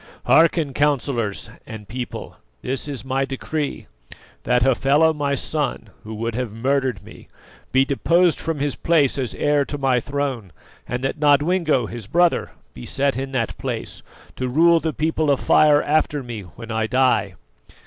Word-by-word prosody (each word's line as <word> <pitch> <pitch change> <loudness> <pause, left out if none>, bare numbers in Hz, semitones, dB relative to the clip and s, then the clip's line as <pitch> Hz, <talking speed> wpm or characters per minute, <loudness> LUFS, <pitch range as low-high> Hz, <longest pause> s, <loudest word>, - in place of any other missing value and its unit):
Hearken, 160 -3 +3
councillors 130 -7 0 0.2
and 110 -2 -9
people, 125 +3 -6 0.3
this 135 +3 -2
is 140 -3 -6
my 135 +1 0
decree: 140 +2 -4 0.6
that 125 -1 +2
Hafela, 140 +5 +3
my 145 -2 -1
son, 135 -6 -3
who 110 +1 -7
would 115 +2 -3
have 125 -1 -3
murdered 130 -2 -1
me, 110 - -14 0.4
be 130 +1 +4
deposed 170 +5 +2
from 165 -1 -3
his 145 -1 -1
place 150 -5 +2
as 130 -3 -3
heir 145 -1 +2
to 145 - -5
my 135 -3 +2
throne, 135 -7 -3 0.4
and 125 +1 -4
that 135 +3 -2
Nodwengo, 150 -1 +3
his 115 -2 -8
brother, 175 +6 +2 0.2
be 60 - -10
set 140 0 0
in 135 +1 -4
that 115 -4 -1
place, - - -5 0.4
to 130 - -2
rule 165 +6 +4
the 160 0 -2
People 155 0 -1
of 140 - +2
Fire 150 -1 +4
after 150 -1 0
me 120 -3 -6
when 110 +6 -10
I 110 0 0
die." 125 -6 +1
135 Hz, 160 wpm, -21 LUFS, 120-150 Hz, 0.6 s, be